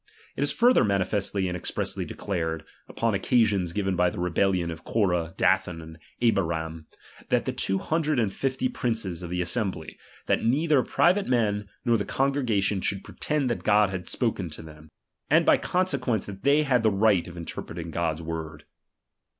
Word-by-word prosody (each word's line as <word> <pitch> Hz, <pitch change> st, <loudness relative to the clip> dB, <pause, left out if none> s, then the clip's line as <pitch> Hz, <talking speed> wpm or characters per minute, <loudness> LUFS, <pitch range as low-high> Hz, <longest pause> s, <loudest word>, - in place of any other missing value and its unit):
It -, -, -4 dB
is 145 Hz, 0 st, +2 dB
^H -, -, -5 dB
further 245 Hz, +2 st, +5 dB
manifestly 100 Hz, -1 st, 0 dB
and 90 Hz, -, -3 dB
expressly 90 Hz, -, -2 dB
declared, 80 Hz, -4 st, -3 dB, 0.2 s
upon 115 Hz, -1 st, -1 dB
^^M -, -, +2 dB
occasion 105 Hz, -3 st, +2 dB
given 95 Hz, +2 st, -1 dB
by 90 Hz, 0 st, +3 dB
the -, -, -7 dB
rebellion 90 Hz, 0 st, +1 dB
of 80 Hz, 0 st, -9 dB
Corah, 90 Hz, -5 st, 0 dB
Dathan, 95 Hz, -3 st, +2 dB
^^M 80 Hz, -, -8 dB
and 80 Hz, +1 st, -12 dB, 0.2 s
Abiram, 80 Hz, -7 st, 0 dB, 0.4 s
and -, -, +2 dB
the -, -, -1 dB
two 95 Hz, -, 0 dB
hundred 155 Hz, -, 0 dB
and 110 Hz, -5 st, +1 dB
fifty 130 Hz, -1 st, -1 dB
princes 110 Hz, -9 st, -3 dB
^H -, -, -5 dB
of -, -, -7 dB
the 90 Hz, 0 st, -1 dB
assembly, 90 Hz, -4 st, -3 dB, 0.3 s
that -, -, +1 dB
neither 145 Hz, +3 st, +3 dB
private 185 Hz, +9 st, +2 dB
men 105 Hz, -5 st, 0 dB, 0.2 s
nor 120 Hz, -1 st, +4 dB
the 100 Hz, -, -3 dB
^H -, -, -7 dB
congregation 120 Hz, -8 st, +1 dB
should 100 Hz, 0 st, -2 dB
pretend 150 Hz, -3 st, -1 dB
that -, -, -2 dB
God 105 Hz, -1 st, +4 dB
had 90 Hz, -2 st, -5 dB
spoken 110 Hz, -8 st, -1 dB
^H 75 Hz, -, -9 dB
by -, -, -9 dB
them, 75 Hz, +1 st, -17 dB, 0.4 s
and -, -, +4 dB
by -, -, +6 dB
consequence 140 Hz, -, 0 dB
that 95 Hz, -1 st, -9 dB
they 145 Hz, +2 st, +4 dB
had 130 Hz, -4 st, +2 dB
the 110 Hz, -, +4 dB
^H 95 Hz, -, -3 dB
right 105 Hz, -5 st, +3 dB
of 85 Hz, 0 st, -10 dB
interpreting 85 Hz, 0 st, -6 dB
GoiFs 80 Hz, -1 st, -1 dB
word. 80 Hz, -2 st, -6 dB
100 Hz, 190 wpm, -26 LUFS, 85-120 Hz, 0.4 s, by